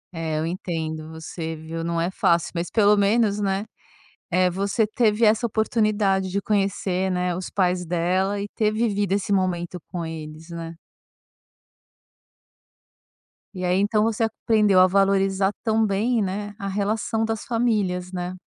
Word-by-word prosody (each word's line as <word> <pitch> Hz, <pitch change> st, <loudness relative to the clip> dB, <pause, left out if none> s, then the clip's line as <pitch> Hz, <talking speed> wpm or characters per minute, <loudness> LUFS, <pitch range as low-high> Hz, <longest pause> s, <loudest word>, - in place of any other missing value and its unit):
É, 160 Hz, -1 st, -2 dB
eu 155 Hz, -, -1 dB
entendo 160 Hz, -3 st, -4 dB
você, 160 Hz, 0 st, -6 dB
viu? 160 Hz, +1 st, -6 dB
Não 170 Hz, 0 st, -1 dB
é 175 Hz, +3 st, 0 dB
fácil. 170 Hz, -2 st, +1 dB
Mas, 170 Hz, 0 st, -3 dB
pelo 210 Hz, -2 st, +4 dB
menos, 205 Hz, +1 st, +2 dB
né, 195 Hz, +1 st, 0 dB, 0.7 s
eh, 185 Hz, +1 st, +3 dB
você 200 Hz, +4 st, 0 dB
teve 220 Hz, 0 st, +2 dB
essa 220 Hz, +3 st, +3 dB
oportunidade 210 Hz, -3 st, +1 dB
de 200 Hz, +2 st, -1 dB
conhecer, 195 Hz, -2 st, 0 dB
né, 180 Hz, -1 st, -1 dB
os 185 Hz, -, -5 dB
pais 180 Hz, -2 st, +1 dB
dela 185 Hz, +4 st, 0 dB
e 200 Hz, -, -4 dB
ter 215 Hz, -1 st, +2 dB
vivido 205 Hz, -3 st, 0 dB
esse 200 Hz, 0 st, +1 dB
momento 180 Hz, -2 st, -1 dB
com 175 Hz, -2 st, -4 dB
eles, 160 Hz, 0 st, -8 dB
né. 170 Hz, -1 st, -6 dB, 2.8 s
E 185 Hz, -, -5 dB
aí 180 Hz, +1 st, +2 dB
então 210 Hz, +2 st, +2 dB
você 225 Hz, 0 st, 0 dB
aprendeu 215 Hz, -3 st, +2 dB
a 185 Hz, -, +7 dB
valorizar 195 Hz, 0 st, +2 dB
também, 220 Hz, +1 st, +1 dB
né, 205 Hz, +2 st, -4 dB
a 200 Hz, -, -5 dB
relação 215 Hz, +3 st, -1 dB
das 225 Hz, -1 st, -2 dB
famílias, 205 Hz, -7 st, 0 dB
né. 180 Hz, 0 st, -4 dB
195 Hz, 145 wpm, -24 LUFS, 175-210 Hz, 2.8 s, a